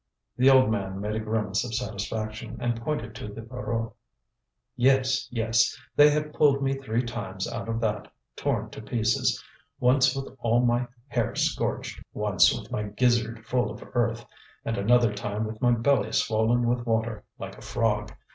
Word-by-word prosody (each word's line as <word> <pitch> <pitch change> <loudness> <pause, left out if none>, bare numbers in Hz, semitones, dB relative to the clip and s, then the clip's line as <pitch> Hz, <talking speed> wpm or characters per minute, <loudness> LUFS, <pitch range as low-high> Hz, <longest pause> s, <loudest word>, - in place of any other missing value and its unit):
The 130 +3 +5
old 130 -4 +6
man 95 -3 -2
made 105 +1 -2
a 110 - -1
grimace 110 -2 -1
of 115 -2 -4
satisfaction 110 0 -4
and 120 -1 -1
pointed 120 -5 -3
to - - -6
the 105 +2 -8
Voreux: 115 -2 -4 0.8
"Yes, 130 +1 +3
yes; 115 -1 +1 0.2
they 145 0 +8
have 150 0 -1
pulled 140 -2 +3
me 135 0 +1
three 125 -3 -1
times 95 -5 -4
out - - -5
of 115 0 -1
that, 110 -2 -2 0.2
torn - - -1
to - - -8
pieces, 110 0 0 0.4
once 130 +1 +4
with 135 -1 -6
all 120 +1 +2
my 120 +1 +1 0.2
hair 120 -4 -1
scorched, - - -1
once - - +4
with - - -6
my 105 - -1
gizzard 115 +1 0
full 120 -1 0
of 105 - -8
earth, 120 -1 0 0.4
and 115 - -1
another 115 +2 +3
time 105 +1 -3
with 110 +1 -7
my 125 - +4
belly 115 -2 +2
swollen 115 +2 +2
with 120 0 0
water, 115 -1 -1
like - - -7
a - - -14
frog. 105 -3 -1
115 Hz, 170 wpm, -27 LUFS, 110-125 Hz, 0.8 s, they